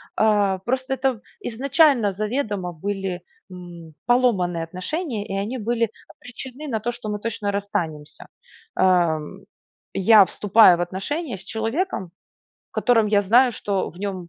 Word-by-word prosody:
а, 205 Hz, -3 st, +2 dB
просто 260 Hz, +5 st, -2 dB
это 260 Hz, -1 st, 0 dB
п 210 Hz, -, -18 dB, 0.3 s
изначально 270 Hz, -2 st, +3 dB
заведомо 210 Hz, -3 st, -3 dB
были, 195 Hz, +1 st, -4 dB, 0.3 s
м, 170 Hz, -3 st, -11 dB
поломанные 195 Hz, -9 st, +2 dB
отношения 210 Hz, -, -4 dB
и -, -, -5 dB
они 225 Hz, +6 st, -3 dB
были 230 Hz, 0 st, 0 dB, 0.2 s
обречены 260 Hz, +4 st, -10 dB
на 225 Hz, -5 st, -1 dB
то, 240 Hz, +3 st, -2 dB
что 240 Hz, -3 st, -7 dB
мы 210 Hz, -, -3 dB
точно 210 Hz, -2 st, -3 dB
расстанемся, 185 Hz, -7 st, -4 dB, 0.5 s
ам. 175 Hz, -2 st, +1 dB, 0.5 s
Я 200 Hz, +1 st, +6 dB
вступаю 200 Hz, -2 st, +5 dB
в -, -, -2 dB
отношения 205 Hz, -, -3 dB
с -, -, -13 dB
человеком, 225 Hz, -, -3 dB, 0.6 s
в -, -, -83 dB
котором 230 Hz, -4 st, +3 dB
я 205 Hz, -1 st, +3 dB
знаю, 240 Hz, +5 st, +4 dB
что 200 Hz, -3 st, -2 dB
в 175 Hz, -, -19 dB
нём 190 Hz, -3 st, -5 dB
205 Hz, 145 wpm, -23 LUFS, 185-240 Hz, 0.6 s, Я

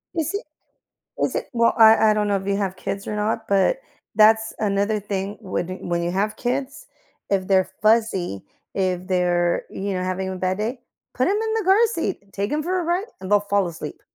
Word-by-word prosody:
Is 325 Hz, +3 st, -1 dB
it 405 Hz, -, -3 dB, 0.8 s
is -, -, 0 dB
it -, -, -3 dB
well, 230 Hz, -1 st, +3 dB
I 220 Hz, -1 st, +7 dB
I 215 Hz, -, +3 dB
don't 210 Hz, -1 st, 0 dB
know 200 Hz, -, +2 dB
if 195 Hz, 0 st, -5 dB
you 200 Hz, 0 st, +1 dB
have 195 Hz, -2 st, -2 dB
kids 195 Hz, +1 st, -5 dB
or 210 Hz, -, -3 dB
not, 220 Hz, +1 st, -1 dB
but 200 Hz, -, +3 dB, 0.4 s
that's 220 Hz, +1 st, +5 dB
another 205 Hz, 0 st, 0 dB
thing 200 Hz, 0 st, -4 dB
when 185 Hz, -4 st, -3 dB
d 185 Hz, -, -5 dB
when 170 Hz, 0 st, -2 dB
you 175 Hz, -, -1 dB
have 210 Hz, +4 st, -1 dB
kids, 270 Hz, -, -3 dB, 0.4 s
if 190 Hz, -2 st, 0 dB
they're 190 Hz, -1 st, +2 dB
fussy, 215 Hz, -, +2 dB, 0.3 s
if 185 Hz, -2 st, -1 dB
they're, 175 Hz, -1 st, +1 dB
you 200 Hz, +1 st, -3 dB
know, 185 Hz, -, -2 dB
having 185 Hz, +1 st, -2 dB
a 185 Hz, -, -4 dB
bad 185 Hz, +1 st, -1 dB
day, 235 Hz, +4 st, -3 dB, 0.3 s
put 255 Hz, -, +1 dB
'em 395 Hz, -, +2 dB
in 445 Hz, 0 st, -1 dB
the 435 Hz, -, -2 dB
car 400 Hz, +5 st, +5 dB
seat, 200 Hz, -, -4 dB
take 200 Hz, +6 st, -2 dB
'em 305 Hz, -, 0 dB
for 365 Hz, +4 st, -1 dB
a 345 Hz, -, -3 dB
ride 350 Hz, +4 st, 0 dB, 0.2 s
and 190 Hz, -, -7 dB
they'll 205 Hz, 0 st, +5 dB
fall 200 Hz, -2 st, +1 dB
asleep. 165 Hz, -, -8 dB
205 Hz, 215 wpm, -23 LUFS, 190-230 Hz, 0.8 s, I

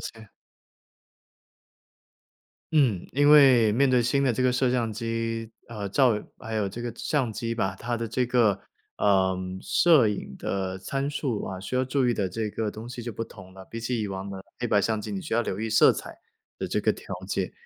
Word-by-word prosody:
解。 110 Hz, -2 st, -9 dB, 2.4 s
嗯， 125 Hz, -, +2 dB
因 145 Hz, +2 st, +4 dB
为 130 Hz, -7 st, +7 dB
面 135 Hz, +5 st, +3 dB
对 125 Hz, -2 st, +3 dB
新 140 Hz, +4 st, +1 dB
的 130 Hz, -, +3 dB
这 125 Hz, +3 st, -1 dB
个 130 Hz, -, +4 dB
摄 125 Hz, 0 st, +1 dB
像 115 Hz, -3 st, 0 dB
机 115 Hz, 0 st, -3 dB, 0.2 s
呃， 105 Hz, -3 st, -5 dB
照 115 Hz, 0 st, +3 dB, 0.2 s
还 110 Hz, 0 st, -6 dB
有 105 Hz, -3 st, 0 dB
这 120 Hz, +5 st, -7 dB
个 120 Hz, -2 st, -4 dB
相 135 Hz, -7 st, -1 dB
机 115 Hz, +1 st, -3 dB
吧， 95 Hz, -4 st, -1 dB
它 120 Hz, 0 st, -2 dB
的 115 Hz, -1 st, -4 dB
这 125 Hz, +2 st, 0 dB
个， 115 Hz, -5 st, +3 dB, 0.4 s
呃， 95 Hz, -2 st, +2 dB, 0.2 s
摄 155 Hz, -10 st, +5 dB
影 95 Hz, -10 st, -5 dB
的 95 Hz, -1 st, -3 dB
参 135 Hz, +9 st, -3 dB
数 135 Hz, -6 st, -2 dB
啊， 95 Hz, -1 st, -6 dB
需 125 Hz, +6 st, -3 dB
要 130 Hz, -, +2 dB
注 130 Hz, -1 st, +1 dB
意 -, -, +3 dB
的 100 Hz, -3 st, -1 dB
这 110 Hz, +3 st, -3 dB
个 110 Hz, 0 st, -2 dB
东 110 Hz, +3 st, -7 dB
西 125 Hz, 0 st, -7 dB
就 120 Hz, -, -4 dB
不 115 Hz, -, -4 dB
同 95 Hz, -4 st, -11 dB
了， 95 Hz, 0 st, -11 dB
比 115 Hz, -, -5 dB
起 115 Hz, +1 st, -2 dB
以 105 Hz, -, -3 dB
往 95 Hz, 0 st, -5 dB
的 95 Hz, -1 st, -7 dB, 0.2 s
黑 120 Hz, -, -1 dB
白 105 Hz, -3 st, +3 dB
相 110 Hz, +2 st, 0 dB
机 105 Hz, -, -6 dB
你 195 Hz, -, -3 dB
需 155 Hz, -, -7 dB
要 120 Hz, +1 st, +3 dB
留 95 Hz, -2 st, -4 dB
意 110 Hz, 0 st, -2 dB
色 110 Hz, -, +6 dB
彩 -, -, -8 dB, 0.4 s
的 -, -, -3 dB
这 -, -, -1 dB
个 -, -, +2 dB
条 -, -, -8 dB
件。 95 Hz, -2 st, -2 dB
115 Hz, 230 characters per minute, -26 LUFS, 105-125 Hz, 2.4 s, 为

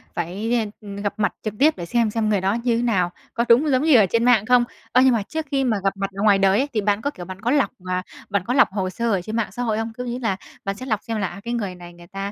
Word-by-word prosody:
phải, 195 Hz, +8 st, -2 dB
ơ, 225 Hz, -2 st, +1 dB, 0.2 s
ừm, 200 Hz, -1 st, -8 dB
gặp 200 Hz, 0 st, -2 dB
mặt 200 Hz, -, +1 dB
trực 215 Hz, -2 st, -3 dB
tiếp 310 Hz, +3 st, +5 dB
để 170 Hz, -, -5 dB
xem, 230 Hz, +3 st, +1 dB
xem 215 Hz, -1 st, 0 dB
người 200 Hz, -3 st, +1 dB
đó 195 Hz, +2 st, +1 dB
như 235 Hz, -2 st, +2 dB
thế -, -, 0 dB
nào, 185 Hz, -7 st, +1 dB, 0.2 s
có 235 Hz, +1 st, 0 dB
đúng 265 Hz, +7 st, +5 dB
giống 260 Hz, +1 st, +2 dB
như 310 Hz, -4 st, +5 dB
ở 215 Hz, -, +6 dB
trên 230 Hz, +5 st, +1 dB
mạng 235 Hz, -4 st, +4 dB
không? 250 Hz, 0 st, +5 dB, 0.3 s
Ơ, 255 Hz, -, +5 dB
nhưng 260 Hz, -, +5 dB
mà 215 Hz, -3 st, 0 dB
trước 315 Hz, +7 st, -4 dB
khi 270 Hz, -1 st, +1 dB
mà 225 Hz, -5 st, +1 dB
gặp 195 Hz, 0 st, 0 dB
mặt 195 Hz, 0 st, -2 dB
ở 200 Hz, -, -3 dB
ngoài 205 Hz, -2 st, +5 dB
đời 195 Hz, +1 st, +4 dB
ấy 280 Hz, -, +1 dB
thì 215 Hz, -, +1 dB
bạn 205 Hz, +1 st, +1 dB
có, 285 Hz, -, -1 dB
kiểu, 180 Hz, -10 st, -9 dB
bạn 190 Hz, +2 st, -9 dB
có 240 Hz, -, 0 dB
lọc, 285 Hz, -2 st, +3 dB, 0.2 s
ờ, 185 Hz, 0 st, -1 dB, 0.3 s
bạn 200 Hz, -3 st, 0 dB
có 245 Hz, -, -1 dB
lọc 280 Hz, -, +6 dB
hồ 190 Hz, -2 st, -2 dB
sơ 230 Hz, +5 st, -2 dB
ở 195 Hz, -3 st, +1 dB
trên 220 Hz, +4 st, -6 dB
mạng 230 Hz, -2 st, -1 dB
xã 245 Hz, -, -4 dB
hội 220 Hz, -2 st, 0 dB
không? 225 Hz, 0 st, -3 dB
Có 250 Hz, -, -4 dB
nghĩa 245 Hz, 0 st, -4 dB
là 225 Hz, -6 st, 0 dB, 0.3 s
bạn 195 Hz, -, -2 dB
sẽ 255 Hz, +6 st, -8 dB
lọc 215 Hz, -4 st, -1 dB
xem 225 Hz, -1 st, -3 dB
là, 200 Hz, -3 st, 0 dB
à, 195 Hz, +3 st, -9 dB
cái 235 Hz, +1 st, -3 dB
người 200 Hz, -6 st, -3 dB
này 175 Hz, -1 st, -12 dB
người 175 Hz, 0 st, -15 dB
ta, 195 Hz, +2 st, -5 dB
215 Hz, 330 wpm, -22 LUFS, 195-240 Hz, 0.3 s, ở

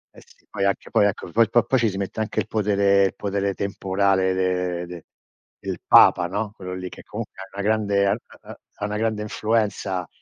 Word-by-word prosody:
eh -, -, -14 dB
sì, -, -, -25 dB
poi 100 Hz, -, -4 dB
anche 100 Hz, -, -1 dB
poi 105 Hz, -, +4 dB
ecco 90 Hz, -3 st, -4 dB
poi 115 Hz, +2 st, +3 dB
po 120 Hz, -, +4 dB
poi 130 Hz, -, +1 dB
ci 115 Hz, -2 st, +2 dB
si 95 Hz, -, -6 dB
mette 100 Hz, +2 st, -4 dB
anche 110 Hz, -, -1 dB
il -, -, 0 dB
potere 100 Hz, -2 st, +3 dB
il 95 Hz, -, -2 dB
potere 100 Hz, -1 st, -2 dB
temporale 95 Hz, -1 st, +1 dB
de 90 Hz, -1 st, -1 dB
de 85 Hz, -2 st, -10 dB, 0.6 s
del -, -, -4 dB
Papa, 85 Hz, -, +6 dB
no. 105 Hz, +3 st, -3 dB
Quello 90 Hz, -3 st, -7 dB
lì, 90 Hz, 0 st, -6 dB
che -, -, -11 dB
comunque 105 Hz, -3 st, -7 dB
ha 95 Hz, -, -7 dB
una 100 Hz, -, -3 dB
grande 100 Hz, -2 st, +2 dB
ha 100 Hz, +1 st, +2 dB, 0.3 s
ha -, -, -12 dB, 0.2 s
ha 105 Hz, -, -4 dB
una 105 Hz, 0 st, -3 dB
grande 110 Hz, -1 st, -1 dB
influenza, 105 Hz, -5 st, -1 dB
100 Hz, 210 wpm, -23 LUFS, 95-105 Hz, 0.6 s, Papa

